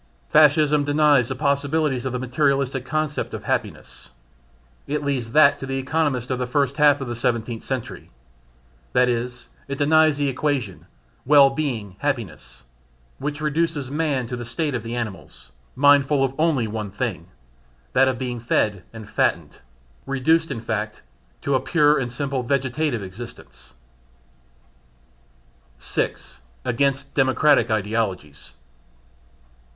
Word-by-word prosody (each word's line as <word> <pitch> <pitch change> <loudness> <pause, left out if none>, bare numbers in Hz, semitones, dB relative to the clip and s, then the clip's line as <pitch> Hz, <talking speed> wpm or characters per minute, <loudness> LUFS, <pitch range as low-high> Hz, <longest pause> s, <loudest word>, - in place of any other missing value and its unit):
Fascism 150 -1 +5
denies 145 -4 +3
the 130 - -3
possibilities 140 -1 0
of 130 - -1
the 125 - -2
materialistic 135 0 0
concept 150 +3 -2
of - - -8
"happiness" - - -4 0.8
it 150 +1 -2
leaves 130 -5 -2
that 145 -2 +5
to 135 - -6
the 135 0 -2
economists 135 -3 -1
of 130 - -1
the 125 - -2
first 140 +1 0
half 145 -2 +4
of 135 - -4
the 120 - -4
Seventeenth 115 -1 -2
Century; 130 -3 -5 0.8
that 125 0 +4
is, 125 0 -3 0.2
it 140 0 -4
denies 155 +1 +4
the 145 -1 0
equation 135 -7 -2 0.4
"well 140 0 +6
being 120 -10 -4
happiness," 60 +1 -4 0.6
which 145 +2 -4
reduces 150 -3 -1
man 145 -4 0
to 125 - -5
the 120 - -6
state 145 +5 -3
of 125 - -2
the 115 +2 -5
animals, 95 - -7 0.2
mindful 145 0 +4
of 135 -1 0
only 150 -8 +2
one 105 -1 -4
thing 95 -5 -4 0.7
that 135 +1 +4
of 130 -2 0
being 125 -1 -4
fed 105 -4 0
and 115 -2 -10
fattened; - - -1 0.5
reduced, 160 +5 +2
in 115 - -4
fact, 110 -2 -4 0.4
to 140 - 0
a 130 - +3
pure 150 +1 +3
and 125 -2 -3
simple 135 +1 -2
vegetative 130 -1 -1
existence. 95 - -11 2.0
6. - - -4 0.3
Against 135 +2 0
Democratic 135 -2 +3
Ideologies. 105 -8 -2
130 Hz, 135 wpm, -22 LUFS, 120-145 Hz, 2.0 s, well